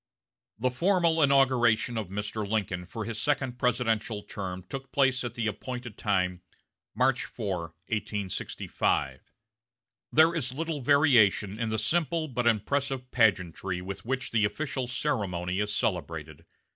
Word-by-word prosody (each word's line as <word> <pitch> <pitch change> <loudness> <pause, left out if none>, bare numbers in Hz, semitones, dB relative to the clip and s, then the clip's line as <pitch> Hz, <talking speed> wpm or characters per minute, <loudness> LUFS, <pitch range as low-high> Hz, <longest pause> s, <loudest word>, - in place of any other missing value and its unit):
The 125 +3 0
formal 170 +3 +2
inauguration 130 -5 +4
of 110 -4 -2
Mr. 105 +1 -3
Lincoln 95 -5 -1
for 110 +2 -5
his 115 -2 -4
second 135 -4 0
presidential 115 -4 0
term 95 -2 -6
took 135 -1 -7
place 130 -1 +2
at 120 -1 -5
the 115 - -2
appointed 120 +2 -4
time, 90 -3 0 0.5
March 130 0 +2
4, 100 -6 -3 0.3
1865. 105 -3 -2 0.9
There 160 +2 +6
is 130 -6 -2
little 160 -1 -3
variation 120 -8 +4
in 115 -1 -1
the 110 - -1
simple 165 +3 +1
but 125 -3 -1
impressive 130 +3 0
pageantry 95 -5 +1
with 95 +2 -6
which 130 +1 -2
the 110 -2 +2
official 130 +3 -1
ceremony 95 -9 -1
is 105 0 0
celebrated. 85 -9 -3
115 Hz, 130 wpm, -28 LUFS, 100-135 Hz, 0.9 s, There